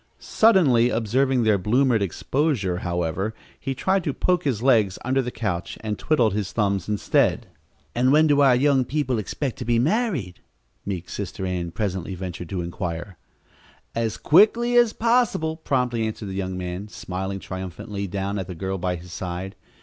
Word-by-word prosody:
Suddenly 150 - +4
observing 125 +3 +1
their 105 -3 +3
bloomered 120 +3 +2
exposure, 100 - 0
however, 90 +4 -2 0.2
he 135 -1 -3
tried 190 +7 +1
to 145 - -1
poke 180 -2 +1
his 120 -5 0
legs 110 -8 +3
under 130 +1 +2
the 125 - -3
couch, 95 -8 -3
and 105 -1 -3
twiddled 120 -9 +2
his 100 -2 -2
thumbs 100 -3 0
instead. 105 -1 +1 0.5
"And 125 +2 +3
when 155 +2 +6
do 145 -2 +4
our 135 -3 +6
young 135 0 +3
people 130 -2 -1
expect 125 +6 -4
to - - -3
be 120 0 +2
married?" 145 - 0 0.5
meek 90 -3 -4
Sister 95 -1 -5
Ann 90 -2 -2
presently 95 -1 -3
ventured 90 -2 -6
to 95 -2 -2
inquire. 85 0 -5 0.8
"As 115 -2 -1
quickly 230 +8 +4
as 240 -2 +5
possible," 230 -10 +1
promptly 125 -7 0
answered 105 -2 -6
the - - -5
young 95 -1 -3
man, 90 +2 -5
smiling 95 -1 -5
triumphantly 95 +2 -6
down 100 +2 -3
at 95 - -4
the 90 - -6
girl 95 +2 -3
by 90 0 -1
his 90 +1 -10
side. 90 +1 -5
110 Hz, 165 wpm, -24 LUFS, 95-135 Hz, 0.8 s, when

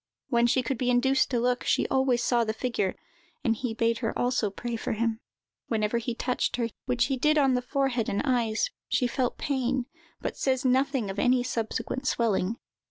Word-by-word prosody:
When 240 -2 +3
she 255 +2 +2
could 245 0 -2
be 250 - +1
induced 265 +2 +3
to 245 - +1
look, 245 +1 +1
she - - +2
always 260 -2 +2
saw 240 -2 +3
the 220 -1 -1
figure, 230 -6 -1 0.5
and 230 -4 +2
he 225 0 -3
bade 230 0 +1
her 225 -3 -2
also 245 -4 +1
pray 235 +4 -5
for 225 - -2
him. 225 0 -1 0.5
Whenever 220 0 0
he 235 0 -3
touched 250 +1 -1
her, 235 -2 -1 0.2
which 245 -2 +2
he 270 0 -1
did 305 +4 +3
on 270 -3 +4
the 250 - +1
forehead 255 -3 0
and 200 - -1
eyes, 235 -5 +1 0.2
she 250 - +1
felt 245 0 -1
pain, 260 -2 -1 0.3
but - - -4
says 260 -1 0
nothing 260 -4 +2
of 195 - -5
any 250 0 +3
subsequent 250 +2 -3
swelling. 220 -2 +1
245 Hz, 195 wpm, -27 LUFS, 230-260 Hz, 0.5 s, on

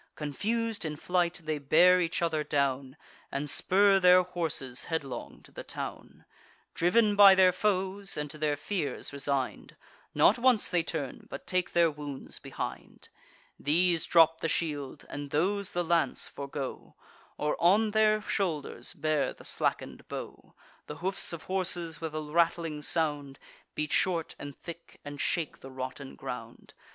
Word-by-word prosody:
Confus'd 220 - -2
in 155 -2 -3
flight, 175 +2 0
they 155 -1 -2
bear 175 +6 +5
each 170 0 -1
other 160 -2 0
down, 140 -1 -1 0.3
And 140 +2 -3
spur 195 +6 +4
their 180 0 +6
horses 160 -8 -2
headlong 155 -5 -5
to - - -16
the - - -8
town. - - -8 0.5
Driv'n 205 +5 +3
by 200 -1 +9
their 185 -1 +6
foes, 195 0 -1
and 150 0 -2
to 155 - -9
their 150 -1 0
fears 145 -5 -3
resign'd, 140 -2 -3 0.4
Not - - +5
once 245 -3 +4
they 175 -1 +2
turn, 160 -5 -5
but - - -8
take 185 -1 -1
their 170 -2 +4
wounds 145 -2 -8
behind. - - -7 0.5
These 170 +3 +2
drop 165 -1 +5
the 165 - 0
shield, 145 -4 -2
and 145 0 -6
those 190 +7 0
the 175 - 0
lance 170 0 +1
forego, 140 -1 -6 0.4
Or 150 - 0
on 210 +5 +4
their 215 0 +3
shoulders 170 -10 -3
bear 155 -1 0
the - - -15
slacken'd - - -2
bow. - - -8 0.3
The - - -6
hoofs 195 +1 0
of 170 -2 -7
horses, 175 -4 -1
with 160 -1 -4
a 155 - -2
rattling 165 0 0
sound, 145 -3 -1 0.4
Beat 150 -1 -2
short 170 -4 +1
and 145 -1 -8
thick, 170 0 -11
and 145 0 -6
shake 165 -4 -1
the 135 - -10
rotten 130 +1 -7
ground. - - -8
165 Hz, 150 wpm, -29 LUFS, 145-185 Hz, 0.5 s, by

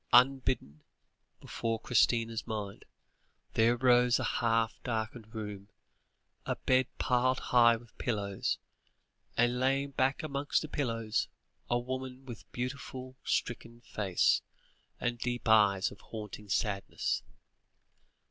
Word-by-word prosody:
Unbidden, 125 - +3 0.6
before 115 -1 -3
Christina's 115 0 +2
mind, 105 -3 -5 0.7
there 115 +2 +4
rose 125 -1 +5
a - - -2
half 115 -1 +1
darkened 110 -1 -4
room, 105 -2 -6 0.7
a - - -1
bed 130 -1 +2
piled 130 +1 +2
high 120 -1 +5
with 115 0 -13
pillows, 100 -5 -1 0.8
and 120 +1 +3
lying 135 +2 +1
back 135 +2 +1
amongst 140 0 0
the - - -5
pillows, 115 -7 -1 0.4
a 120 - +3
woman 130 +1 -5
with 120 -4 -8
a - - -24
beautiful, 130 0 -5
stricken 120 0 -2
face, 100 -6 +2 0.6
and 120 0 -1
deep 120 0 -2
eyes 100 -3 +5
of - - -13
haunting 105 -2 -8
sadness. 100 0 -1
120 Hz, 115 wpm, -31 LUFS, 110-130 Hz, 0.8 s, rose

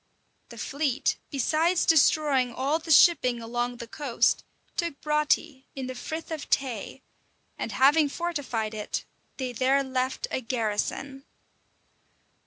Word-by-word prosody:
The 235 - -11
fleet, 280 +2 -1
besides 315 +6 +1
destroying 290 -5 +4
all 275 +6 0
the 325 - -12
shipping 275 -6 +5
along 240 +1 -3
the 235 - -7
coast, 255 +1 0 0.3
took 340 -5 -2
Broughty, 300 -2 0
in 265 -1 -4
the 255 - -5
Frith 315 +6 -6
of 315 -2 -5
Tay; 250 -6 -2 0.5
and - - -4
having 290 +3 +4
fortified 275 -10 -3
it, 210 -1 -4 0.3
they 255 -2 -3
there 265 +3 +2
left 260 0 -2
a - - -1
garrison. 250 +4 -3
270 Hz, 125 wpm, -27 LUFS, 245-300 Hz, 0.5 s, shipping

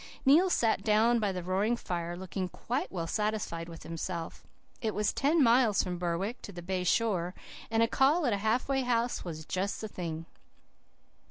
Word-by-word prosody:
"Neil 320 +8 +6
sat 225 -10 +2
down 225 +2 +4
by 205 -3 +1
the 180 -2 -4
roaring 195 +6 +1
fire, 175 -4 -4
looking 185 0 -4
quite 250 +8 -3
well 170 -3 -3
satisfied 210 -4 -2
with 165 -1 -10
himself. 165 0 -5 0.3
It 220 -2 -1
was 210 0 +1
ten 295 +2 +3
miles 235 -3 +4
from 180 -2 -4
Berwick 180 +7 -2
to - - -8
the 175 -2 -8
bay 185 0 -1
shore, 180 -3 +1 0.3
and 225 0 +3
a - - +3
call 290 +8 +3
at 240 - +2
a - - +1
half 220 +4 0
way 270 -1 +1
house 240 -1 0
was 160 -3 -6
just 190 +4 -2
the 220 - -4
thing. 165 -5 -5
205 Hz, 185 wpm, -30 LUFS, 175-235 Hz, 0.3 s, Neil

